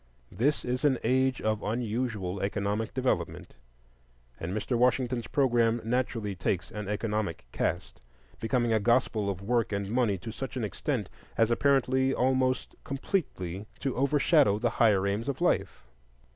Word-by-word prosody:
This 140 +6 0
is 125 +2 -2
an 140 -3 +4
age 130 +1 +2
of 110 -1 0
unusual 110 -4 -2
economic 100 +2 -1
development, 130 0 -2 0.9
and 80 - -4
Mr. 110 +5 -1
Washington's 125 -1 +1
programme 120 -4 +2
naturally 115 -3 -1
takes 90 -1 -2
an 105 -2 -5
economic 105 -3 -2
cast, - - -2 0.4
becoming 120 0 +1
a 110 - +3
gospel 115 -2 +2
of 95 -1 -4
Work 115 +1 +1
and 100 0 -2
Money 115 -5 +2
to 95 +6 -7
such 130 +3 -6
an 120 - -2
extent 105 - -2 0.3
as 115 0 +3
apparently 130 0 +2
almost 130 0 +1
completely 105 - -3
to 135 -2 -1
overshadow 140 - +3
the 115 +2 0
higher 100 -4 +5
aims 105 +6 -1
of 140 - -3
life. - - 0
115 Hz, 145 wpm, -29 LUFS, 105-130 Hz, 0.9 s, higher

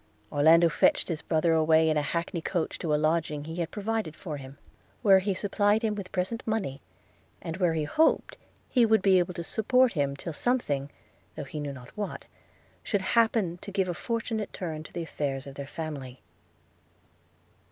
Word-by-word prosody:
Orlando 160 +4 +6
fetched 165 - +2
his 160 -3 -2
brother 165 0 +1
away 160 0 +4
in 155 - +2
a 150 - +2
hackney 170 +3 -2
coach 170 -1 -2
to 165 - -2
a - - +3
lodging 155 -1 0
he 160 +3 -7
had 170 -2 -2
provided 215 -6 -3
for 155 -6 -6
him; 135 0 -11 0.5
where 195 -3 +7
he 195 0 -1
supplied 205 +2 +1
him 220 -1 +1
with 200 -3 -6
present 190 +6 -2
money, 195 -12 -2 0.6
and 165 +1 -5
where 175 -4 +2
he 155 - 0
hoped 310 - +2 0.3
he 250 - +3
should 220 -2 +3
be 190 -2 +5
able 175 0 -1
to 170 - -4
support 250 +6 +2
him 140 -4 0
till 165 +4 -6
something 145 - 0 0.5
(though 155 - -5
he 150 +2 -6
knew 145 -1 -3
not 125 -3 -12
what) 210 -2 -5 0.6
should 205 -3 -1
happen 220 -7 +2
to - - -7
give 195 -1 0
a 175 - -1
fortunate 225 +2 -3
turn 160 -4 -4
to 155 - -12
the 170 - -4
affairs 140 -4 -3
of 140 - -9
their 140 0 -7
family. 140 -5 -7
170 Hz, 185 wpm, -28 LUFS, 150-205 Hz, 0.6 s, where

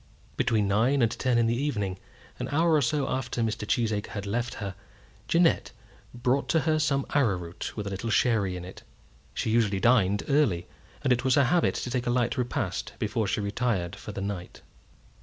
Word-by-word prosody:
Between 105 -3 +1
nine 120 +7 +3
and 115 - +2
ten 125 -2 0
in 120 - +3
the 115 +1 +1
evening, 105 -9 -2 0.4
an - - -3
hour 165 +3 +2
or 150 - +4
so 140 +2 +1
after 125 -2 -2
Mr. 110 -1 -2
Cheesacre 110 -3 0
had 100 -2 -5
left 120 +4 -2
her, 100 -3 -5 0.5
Jeannette 170 0 +3 0.4
brought 125 +3 0
to 160 - +3
her 155 0 +1
some 140 -3 +1
arrowroot 95 -13 -1
with 105 - -3
a 100 - -4
little 100 +4 -4
sherry 105 -5 +2
in 90 - -7
it. 90 - -10 0.5
She 110 - -1
usually 110 -4 +2
dined 105 -4 +3
early, 135 - +2 0.4
and 130 -3 +4
it 125 +1 -1
was 130 -1 +3
her 140 - +5
habit 170 +7 +2
to 125 - -4
take 125 -1 -1
a - - +2
light 120 -1 +1
repast 125 -3 -2
before 105 0 -1
she 105 - 0
retired 100 -3 -1
for 100 - -8
the 100 - -5
night. 95 -3 -5
115 Hz, 195 wpm, -27 LUFS, 100-130 Hz, 0.5 s, her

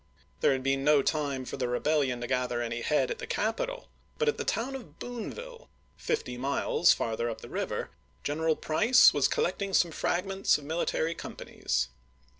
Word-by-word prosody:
There 135 - +4
had 130 -1 -2
been 135 0 +1
no 145 -1 +5
time 140 -4 -1
for - - -5
the 125 -2 -1
rebellion 130 0 +1
to - - -2
gather 125 -1 0
any 120 0 -3
head 150 - +1
at 485 - -4
the 455 - -6
capital; - - -2 0.3
but 465 - 0
at 450 - +1
the - - 0
town 245 +4 -1
of 185 - -9
Boonville, 470 - -7 0.3
fifty 280 - -2
miles 140 +5 +3
farther 115 +1 0
up 115 - -6
the - - -10
river, - - -3 0.3
General 160 +2 +1
Price 215 +14 +5
was - - +3
collecting 200 - -1
some 170 - +4
fragments 190 +4 +1
of 150 - -11
military 160 +1 -1
companies. 65 - -3
155 Hz, 175 wpm, -29 LUFS, -, 0.3 s, no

